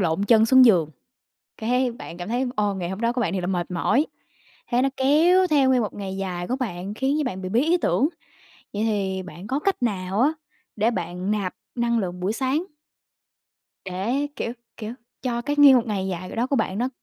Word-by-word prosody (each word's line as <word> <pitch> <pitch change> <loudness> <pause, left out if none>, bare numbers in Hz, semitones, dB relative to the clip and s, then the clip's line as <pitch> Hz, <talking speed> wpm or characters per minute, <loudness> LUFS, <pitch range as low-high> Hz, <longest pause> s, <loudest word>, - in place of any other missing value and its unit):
lộn 175 +2 +1
chân 220 0 +5
xuống 260 +2 +7
giường, 175 -10 +4 0.7
cái 250 +2 +1
bạn 175 -7 -9
cảm 175 +3 -6
thấy, 245 +3 0
ô, 205 -1 +1
ngày 175 -2 -3
hôm 190 +3 -5
đó 235 +1 +1
của 245 - -1
bạn 190 -6 0
thiệt 185 - -1
là - - -1
mệt 180 -2 -2
mỏi. 250 - +2 0.7
Thế 245 +1 +3
nó 275 - +2
kéo 335 +8 +4
theo 280 -4 +3
nguyên 255 -2 +4
một 210 - -3
ngày 195 -1 -5
dài 180 -2 -3
của 255 - 0
bạn, 200 -5 -4
khiến 270 +6 0
cho 300 - +1
bạn 190 -6 -4
bị 185 - -4
bí 230 +5 +2
ý 330 +4 +3
tưởng. 300 -3 +1 0.6
Vậy 205 - -1
thì 195 -4 -1
bạn 180 +3 -10
có 270 +3 -1
cách 385 -4 -1
nào 195 -2 -1
á, 290 +5 +3 0.4
để 220 +3 +2
bạn 180 +1 -3
nạp 200 -4 -2 0.2
năng 235 -1 +1
lượng 180 -2 -4
buổi 190 +4 -1
sáng? 270 +6 0 1.2
Để, 225 +11 -1
kiểu, 230 - -3 0.2
kiểu, 220 +1 -5 0.3
cho 240 -2 -2
cái 290 +3 -2
nguyên 280 -2 +9
một 245 -2 +2
ngày 195 -3 -2
dài 185 -1 -4
c - - -7
đó, 240 +3 0
của 280 - 0
bạn 190 - -1
nó 245 +3 0
220 Hz, 220 wpm, -24 LUFS, 190-260 Hz, 1.2 s, nguyên